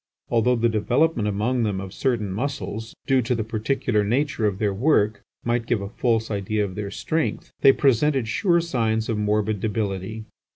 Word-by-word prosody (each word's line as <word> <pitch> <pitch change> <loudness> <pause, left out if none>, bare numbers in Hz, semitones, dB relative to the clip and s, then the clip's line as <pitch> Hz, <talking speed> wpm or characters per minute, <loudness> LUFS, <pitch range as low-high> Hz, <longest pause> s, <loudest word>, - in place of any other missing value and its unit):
Although 120 +2 +3
the 120 0 +2
development 115 +3 +1
among 110 +5 0
them 105 -4 0
of 95 0 -7
certain 115 -5 -1
muscles, 115 -1 -4
due 135 -1 +3
to 125 +1 0
the 110 - -1
particular 110 0 0
nature 120 +1 +1
of 95 -2 -2
their 105 -1 0
work, 105 -3 +2 0.2
might 120 -1 0
give 120 -3 +1
a 100 0 -5
false 115 -1 0
idea 105 +1 -1
of 95 - -6
their 100 +1 -4
strength, 155 +9 -2
they 135 - +8
presented 135 -1 +2
sure 170 - +2
signs 115 -8 -1
of 110 -2 0
morbid 105 0 0
debility. 105 0 -3
110 Hz, 175 wpm, -24 LUFS, 105-125 Hz, 0.2 s, they